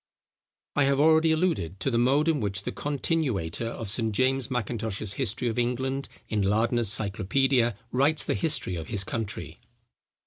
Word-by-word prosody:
I 145 - +4
have 140 0 +2
already 160 +1 +5
alluded 155 - 0
to 135 - 0
the 115 - +2
mode, 140 +6 +3
in 160 -3 +2
which 100 -2 -2
the - - -3
continuator 135 - -1
of 115 -1 -5
Sir 110 0 0
James 130 +3 +1
Mackintosh's 110 -4 -2
History 110 +5 -1
of 115 +1 -1
England 130 +3 -1 0.2
in 105 -1 -1
Lardner's 115 +3 +2
Cyclopædia, 110 +4 +2 0.2
writes 140 +5 +2
the - - -1
history 150 - 0
of 80 -2 -6
his 100 -3 -1
country. 110 +1 -5
120 Hz, 160 wpm, -27 LUFS, 105-140 Hz, 0.2 s, already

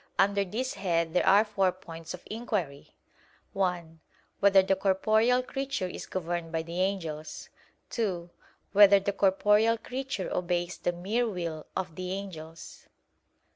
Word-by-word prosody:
Under 200 +1 +3
this 235 +7 -3
head 170 -3 -1
there 180 - +2
are 200 +3 +6
four 195 -3 +1
points 165 -2 -9
of 180 - -16
inquiry: 205 - -4 0.6
(1) 175 -4 -2 0.4
Whether 195 -1 +6
the 195 0 +2
corporeal 215 +6 +2
creature 270 -6 -3
is 180 - -6
governed 175 -2 -3
by 165 -1 -1
the 170 +2 -3
angels? 160 -6 -3 0.4
(2) 180 -7 -2 0.4
Whether 200 0 +7
the 200 +1 -2
corporeal 210 +4 +3
creature 255 -3 -4
obeys 175 0 -1
the 175 - 0
mere 210 +7 -1
will 170 -5 -5
of 185 -3 -3
the 185 +2 -4
angels? 165 -5 -8
190 Hz, 135 wpm, -29 LUFS, 170-205 Hz, 0.6 s, Whether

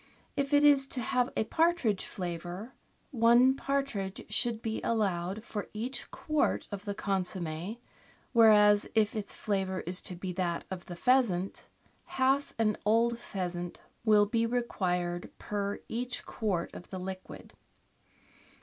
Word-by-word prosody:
If 280 0 -1
it 290 0 +5
is 280 -2 +6
to 265 - -3
have 250 +2 +1
a - - +3
partridge 320 - +1
flavour, 180 +5 -5 0.4
one 240 +1 +5
partridge 275 -9 -2
should 235 -2 +1
be 220 -1 -2
allowed 195 -2 -1
for 210 -3 -5
each 245 +5 -3
quart 305 -1 0
of 200 0 -6
the 205 -1 -3
consomm^, 185 0 -2 0.6
whereas 210 -3 +6
if 215 -1 +3
its 205 -2 -4
flavour 190 -2 -1
is 180 +2 -1
to 180 - -6
be 180 +1 -5
that 175 -2 -2
of 185 -2 -6
the 175 - -6
pheasant, 200 -4 +1 0.5
half 270 +2 +2
an 215 -2 +2
old 230 +2 +3
pheasant 175 -4 -5 0.2
will 210 -2 +5
be 230 +2 +1
required 180 -7 -1
per 205 -1 -3
each 245 +2 -3
quart 190 -6 -2
of - - -10
the 190 - -5
liquid. 185 0 -7
210 Hz, 140 wpm, -30 LUFS, 185-240 Hz, 0.6 s, is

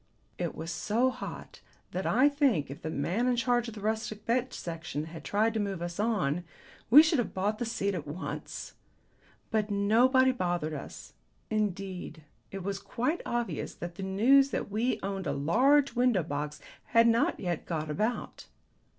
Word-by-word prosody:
It - - -2
was 165 +1 -5
so 235 +9 +1
hot 250 - -8 0.3
that 185 +1 -2
I 255 +6 +5
think, 270 - +1
if 140 - -9
the 160 - -4
man 180 - 0
in 250 - +3
charge 240 0 +1
of 230 - -7
the 210 - -8
Rustic 215 0 -2
Bench 250 +2 +1
Section 165 -3 -5
had 160 -1 -9
tried 215 +5 +1
to 220 - -1
move 200 -3 -2
us 175 +2 -5
on, 180 -8 0 0.5
we 290 +7 +10
should 315 -3 +2
have 240 - -2
bought 205 +3 0
the 240 - -2
seat 200 -4 -1
at 165 -5 -5
once. 160 +6 -6 0.8
But 215 -1 +1
nobody 240 +6 +4
bothered 175 -9 -1
us. 145 - -8 0.4
Indeed 190 -6 -3 0.3
it 195 -1 -6
was 195 +1 -3
quite 245 - -2
obvious 240 -1 -2
that 175 0 -6
the 190 - -9
news 240 +9 +4
that 205 - -3
we 230 +5 0
owned 195 -1 -3
a - - 0
large 265 - +3
window 245 -7 +2
box 150 0 -4 0.3
had 230 0 +4
not 230 0 +2
yet 175 -4 -3
got 155 -2 -2
about. 215 +9 -2
205 Hz, 175 wpm, -30 LUFS, 175-240 Hz, 0.8 s, we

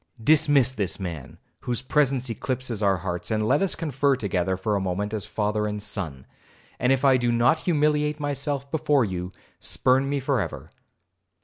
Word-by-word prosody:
Dismiss 145 -3 +4
this 100 -6 -1
man, 85 -8 -6 0.2
whose 120 0 -3
presence 135 -2 +1
eclipses 120 0 -3
our 100 -2 +3
hearts, 90 0 -4
and 110 -1 0
let 140 +5 +3
us 195 - +1
confer 140 -3 +1
together 95 -5 -1
for 105 +3 -1
a 100 - 0
moment 95 +3 -2
as 105 -3 -2
father 105 0 -1
and 105 0 -3
son, 95 -11 -5 0.5
and 125 - +2
if 135 +1 +2
I 135 -1 +6
do 120 -1 0
not 120 +7 +3
humiliate 150 -2 +1
myself 140 -1 -3
before 145 -5 +2
you, 90 -2 -4 0.3
spurn 130 +2 +1
me 140 0 0
for 135 -3 0
ever. - - -6
125 Hz, 175 wpm, -25 LUFS, 100-140 Hz, 0.5 s, I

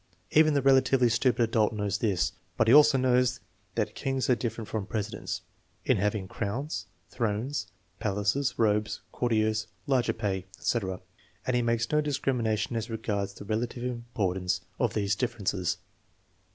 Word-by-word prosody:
Even 155 -1 +5
the 140 - +2
relatively 135 -2 +5
stupid 120 +1 +2
adult 110 -1 +2
knows 105 -2 -1
this; 100 -6 +1 0.3
but - - +3
he 115 - +6
also 150 -1 +8
knows 125 -1 +2 0.4
that - - 0
kings 135 -1 -1
are - - +5
different 115 -2 -4
from 110 -2 -3
presidents 110 -1 -3 0.4
in - - +3
having 105 -1 0
crowns, 100 - -3 0.2
thrones, 115 0 -1 0.3
palaces, 110 +5 0
robes, 105 -1 +1
courtiers, 110 -2 +1 0.2
larger 130 -4 +2
pay, 95 -4 -2
etc., 95 -6 -1 0.4
and 130 - +1
he 120 - +3
makes 115 0 0
no 150 0 +4
discrimination 125 -7 0
as 115 +1 -2
regards 105 -3 -2
the - - -9
relative 120 +3 -2
importance 95 -7 -1 0.2
of 120 -4 +1
these 105 -1 +1
differences. 100 -7 -1
115 Hz, 145 wpm, -28 LUFS, 105-125 Hz, 0.4 s, also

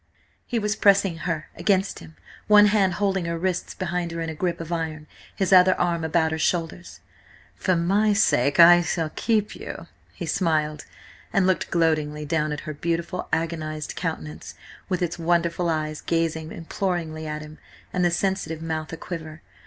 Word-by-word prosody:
He 240 - -1
was 210 -1 0
pressing 195 -5 +3
her 160 -1 -3
against 195 -1 +1
him, 80 -1 -13 0.3
one 210 -1 +8
hand 200 -4 +3
holding 195 -3 0
her 170 0 -2
wrists 180 +1 -2
behind 175 -1 -2
her 170 - -5
in 165 0 -3
a - - -5
grip 175 +2 -2
of 165 0 -7
iron, 160 -2 -3 0.3
his 195 -1 +1
other 185 0 +6
arm 170 -2 0
about 160 0 +1
her 160 - -2
shoulders. 170 +1 -2 0.5
"For 185 - +1
my 195 +6 +2
own 210 - +3
sake 140 - +2
I 175 +1 +9
will 160 -2 -1
keep 215 -2 0
you," - - -8 0.3
he - - -5
smiled, 155 -4 0 0.5
and 195 -2 +2
looked 185 -1 +1
gloatingly 155 -3 0
down 155 0 0
at 150 - -4
her 155 - -6
beautiful, 170 +4 -3
agonised 160 -2 -2
countenance, 160 -3 -5 0.3
with 185 -2 0
its 175 0 -3
wonderful 170 +1 +1
eyes 155 -1 -2
gazing 165 -1 -1
imploringly 165 -2 -3
at 150 0 -4
him, 155 +1 -12 0.3
and 180 - +1
the 175 - +4
sensitive 175 -2 -1
mouth 160 -1 -3
a 165 - -5
quiver. 160 -3 -7
170 Hz, 175 wpm, -24 LUFS, 155-185 Hz, 0.5 s, I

